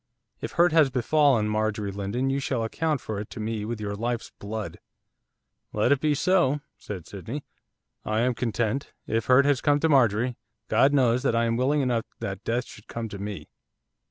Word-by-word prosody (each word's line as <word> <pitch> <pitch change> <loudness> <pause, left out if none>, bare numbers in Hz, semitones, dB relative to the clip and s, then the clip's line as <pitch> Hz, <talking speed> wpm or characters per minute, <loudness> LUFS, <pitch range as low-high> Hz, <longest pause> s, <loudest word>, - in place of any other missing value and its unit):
If - - -5
hurt 175 +1 +4
has 155 -3 +5
befallen 130 -2 +3
Marjorie 105 -1 -1
Lindon 100 +7 -2
you 135 - 0
shall 130 -4 -1
account 150 +4 -1
for 110 -2 -4
it 105 - -6
to - - -8
me 110 -1 -3
with 115 0 -4
your 105 -1 -3
life's 115 +3 -3
blood.' 105 +1 -5 0.9
'Let 105 +4 +2
it 140 - +4
be 150 -1 +2
so,' 150 -4 +2 0.2
said 95 -5 -7
Sydney. 115 +10 -6 0.6
'I 110 +1 0
am 125 +1 +2
content. 120 +2 -2
If 115 -1 -1
hurt 130 +2 +6
has 145 -2 +2
come 145 -1 +3
to 160 - +3
Marjorie, 120 -3 +3 0.3
God 135 - +4
knows 125 -3 +3
that 125 -3 +1
I 115 0 +2
am 115 0 +1
willing 140 +4 +2
enough 120 -4 0
that - - -5
death 120 +1 -1
should 105 - -14
come 115 -1 -5
to 100 - -7
me. 100 0 -6
120 Hz, 190 wpm, -26 LUFS, 110-140 Hz, 0.9 s, hurt